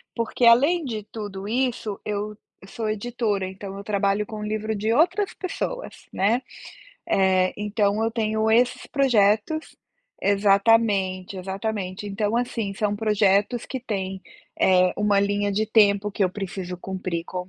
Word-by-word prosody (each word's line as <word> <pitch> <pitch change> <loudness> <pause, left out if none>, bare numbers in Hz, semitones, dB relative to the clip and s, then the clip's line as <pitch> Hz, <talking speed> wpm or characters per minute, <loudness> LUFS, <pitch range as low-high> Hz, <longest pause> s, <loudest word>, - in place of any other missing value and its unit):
Porque, 230 +1 0
além 285 +9 +5
de 220 -5 -4
tudo 205 -3 -6
isso, 235 -3 -1
eu 210 0 -3 0.2
eu 190 - -15
sou 220 0 -3
editora, 215 -2 -1
então 195 +1 -8
eu 200 - -7
trabalho 200 0 0
com 215 - -8
o - - -5
livro 215 +1 -2
de 215 +2 -1
outras 350 - +2
pessoas, - - -5
né, 220 +6 +1 0.7
eh, 185 -1 +3
então 210 +1 0
eu 225 - -1
tenho 220 -1 0
esses 240 +3 +2
projetos 245 +2 +1 0.5
exatamente, 200 -2 +2
exatamente. 195 +1 -4
Então, 205 +2 -1
assim, 235 -4 -2
são 205 +1 0
projetos 210 +2 +2
que 260 - -4
têm, 190 -5 -4 0.4
eh, 185 -1 +4
uma 205 -1 +2
linha 205 0 0
de 215 +2 0
tempo 210 -2 +3
que 200 - -1
eu 185 - 0
preciso 185 -2 -5
cumprir 185 -2 -4
com 180 +1 -6
210 Hz, 150 wpm, -24 LUFS, 195-225 Hz, 0.7 s, além